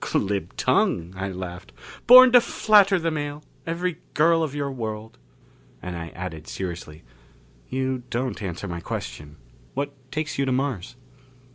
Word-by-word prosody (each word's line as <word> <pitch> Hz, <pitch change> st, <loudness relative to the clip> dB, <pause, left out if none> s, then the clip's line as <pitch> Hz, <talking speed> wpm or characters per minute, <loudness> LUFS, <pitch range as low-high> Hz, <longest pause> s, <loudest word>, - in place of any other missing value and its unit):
"Glib 100 Hz, 0 st, -1 dB
tongue," 85 Hz, +1 st, +1 dB
I 95 Hz, +1 st, -3 dB
laughed. 90 Hz, -1 st, -7 dB, 0.4 s
"Born 255 Hz, +1 st, +10 dB
to 245 Hz, 0 st, +8 dB
flatter 205 Hz, -4 st, +4 dB
the 165 Hz, -1 st, -1 dB
male 145 Hz, -1 st, -4 dB, 0.2 s
every 170 Hz, 0 st, -2 dB, 0.2 s
girl 165 Hz, +2 st, +4 dB
of 150 Hz, -3 st, -2 dB
your 140 Hz, -1 st, -2 dB
world." 110 Hz, -3 st, -6 dB, 0.6 s
And 90 Hz, -1 st, -6 dB
I 85 Hz, -1 st, -5 dB
added 80 Hz, -3 st, -6 dB
seriously, 85 Hz, -5 st, -6 dB, 0.7 s
"You 130 Hz, -1 st, -1 dB
don't 125 Hz, 0 st, -2 dB
answer 95 Hz, 0 st, -4 dB
my 85 Hz, -2 st, -4 dB
question. 75 Hz, -3 st, -6 dB, 0.4 s
What 140 Hz, +1 st, -2 dB, 0.2 s
takes 155 Hz, -2 st, -3 dB
you 140 Hz, -, +2 dB
to 130 Hz, -, 0 dB
Mars?" 130 Hz, -7 st, -2 dB
130 Hz, 145 wpm, -24 LUFS, 90-155 Hz, 0.7 s, Born